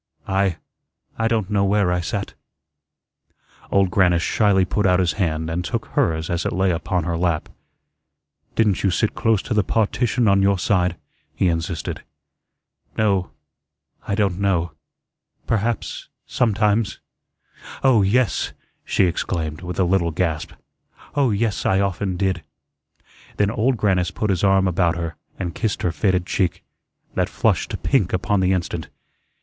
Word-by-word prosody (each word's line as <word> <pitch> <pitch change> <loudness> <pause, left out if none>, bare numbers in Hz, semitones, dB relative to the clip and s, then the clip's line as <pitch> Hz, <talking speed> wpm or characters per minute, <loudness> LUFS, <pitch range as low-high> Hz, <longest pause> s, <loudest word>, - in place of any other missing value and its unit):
"I 95 -3 +1 0.6
I 115 - +2
don't 110 -3 -1
know 100 -1 +2
where 100 -2 +2
I 90 - +1
sat." 85 - -3 1.4
Old 95 -2 +2
Grannis 90 -2 +3
shyly 100 -3 +3
put 105 +2 +1
out 90 0 +4
his 90 -3 +2
hand 80 -2 0
and 85 +2 -2
took 90 - -3
hers 80 0 0
as 85 0 -1
it - - -1
lay 95 0 +2
upon 90 +1 -1
her 85 +1 -2
lap. 85 -2 0 1.1
"Didn't 105 -4 +2
you 100 - +2
sit 105 +4 0
close 110 -3 +1
to 115 - -2
the 105 -1 +3
partition 115 +3 +1
on 100 -1 +4
your 100 0 +3
side?" 90 -2 +1 0.4
he 95 - +2
insisted. 80 -1 -3 1.0
"No 100 -4 +1 0.8
I 100 - 0
don't 100 -4 0
know 90 -4 +1 0.7
perhaps 115 0 -2 0.2
sometimes. 110 -2 +1 0.8
Oh, 130 -5 +5
yes," 105 +1 +1 0.3
she - - +1
exclaimed, 85 -2 -2
with 90 -1 -5
a - - +4
little 90 -1 +2
gasp, 80 -2 -2 0.6
"Oh, 140 -4 +2
yes, 105 -1 0
I 95 - +2
often 95 -1 -1
did." 95 -2 0 1.0
Then 100 0 +2
Old 120 +3 +1
Grannis 95 -4 +1
put 100 +2 -1
his 90 -1 -1
arm 95 -1 +4
about 85 -2 +1
her, 85 -1 -4 0.2
and 90 -2 -3
kissed 110 -4 -2
her 90 - +1
faded 90 0 +1
cheek, 90 -2 -1 0.5
that - - 0
flushed - - +1
to - - -3
pink 110 -10 +1
upon 90 +2 +1
the 95 0 +2
instant. 85 -3 -2
95 Hz, 150 wpm, -22 LUFS, 90-105 Hz, 1.4 s, Oh